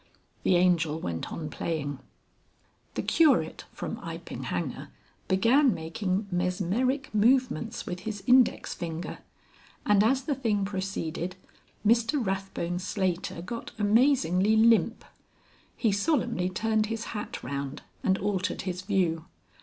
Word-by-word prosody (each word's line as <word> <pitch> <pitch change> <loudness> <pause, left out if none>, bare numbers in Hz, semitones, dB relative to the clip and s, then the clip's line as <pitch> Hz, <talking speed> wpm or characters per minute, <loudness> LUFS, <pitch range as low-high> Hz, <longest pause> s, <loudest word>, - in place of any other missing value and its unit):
The 185 - +3
Angel 170 -3 +3
went 85 - -4
on 155 - -4
playing. 145 -4 -3 1.0
The - - -1
Curate 315 -4 +3
from - - -5
Iping - - -7
Hanger - - -3 0.4
began 230 +6 +4
making 185 +5 -2
mesmeric 190 +10 0
movements 240 +1 +2
with 180 0 -4
his 205 +1 -5
index 255 -1 +4
finger, 165 -1 -5 0.7
and 205 -1 +5
as 260 +4 +2
the 290 - 0
thing 220 -7 0
proceeded 185 -3 -3 0.5
Mr 230 +4 +4
Rathbone 190 -2 -2
Slater 185 -3 -2
got 230 +5 -6
amazingly 215 - +3
limp. 225 0 +4 0.7
He 225 - +2
solemnly 230 - +1
turned 220 +3 +1
his 225 0 -3
hat 210 -1 -5
round 140 +1 -4 0.2
and 190 0 +3
altered 200 -1 -1
his 185 -1 -3
view. 180 -5 0
195 Hz, 120 wpm, -28 LUFS, 175-225 Hz, 1.0 s, and